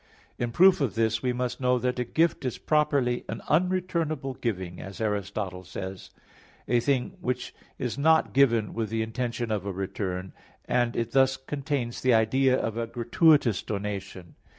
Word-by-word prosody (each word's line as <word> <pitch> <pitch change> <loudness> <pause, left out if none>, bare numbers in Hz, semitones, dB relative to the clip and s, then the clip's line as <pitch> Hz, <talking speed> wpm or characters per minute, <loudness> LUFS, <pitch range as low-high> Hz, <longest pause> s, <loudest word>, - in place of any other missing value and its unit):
In 120 - -1
proof 185 +5 +5
of 125 -9 0
this 115 0 +1
we 125 - 0
must 125 +1 -3
know 125 0 +3
that 125 +1 -1
a - - +1
gift 160 +6 +1
is 130 -3 -2
properly 140 -5 +1
an - - -5
unreturnable 165 -5 0
giving, 95 -6 -3
as 95 0 -9
Aristotle 100 -3 -2
says 95 +1 -7
(Topic. - - -34
iv, - - -28
4) - - -3
i.e. - - +6
a - - +4
thing 140 +8 0
which 125 -4 -3 0.2
is 125 +2 -3
not 160 +2 +3
given 115 -6 +3
with 115 -2 -2
the 110 0 -1
intention 120 0 -3
of 105 -3 -1
a 100 - -3
return 95 -1 -4 0.3
and 120 -1 +1
it 115 0 -2
thus 130 0 +3
contains 135 -3 -3
the 130 -2 +4
idea 130 +4 +3
of 110 -3 -2
a 115 -1 -2
gratuitous 120 - +3
donation. 100 -4 -5
120 Hz, 180 wpm, -27 LUFS, 105-135 Hz, 0.3 s, i.e